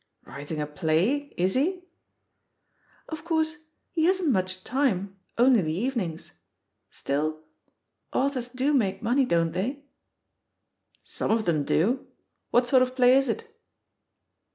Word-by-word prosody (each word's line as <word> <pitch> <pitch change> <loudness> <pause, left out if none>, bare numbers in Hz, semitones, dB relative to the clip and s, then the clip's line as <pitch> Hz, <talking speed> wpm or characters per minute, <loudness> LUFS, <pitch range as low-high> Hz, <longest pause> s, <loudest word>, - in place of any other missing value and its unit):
"Writing 145 +2 -6
a 150 - -1
play? 175 - 0
Is 185 +2 +1
he?" 355 +7 0 1.2
"Of 315 -1 -7
course 315 -2 -1 0.3
he 320 -2 +1
hasn't 365 -4 +2
much 185 -3 -1
time, 200 -7 -1 0.2
only 245 -2 +5
the 155 -2 -2
even 240 +5 -1
ings. 165 -3 -6 0.6
Still 155 +3 -2 0.7
Authors 260 -3 0
do 260 +4 0
make 195 -8 +1
money, 255 +4 +3
don't 165 -6 +1
they?" 245 - -3 1.2
Some - - -4
of 220 0 +2
them 155 -4 +1
do. 235 - +1 0.4
What 245 +1 +3
sort 255 +1 +4
of 255 0 0
play 250 0 +6
is 270 -1 +3
it?" 455 0 -4
245 Hz, 130 wpm, -26 LUFS, 180-280 Hz, 1.2 s, play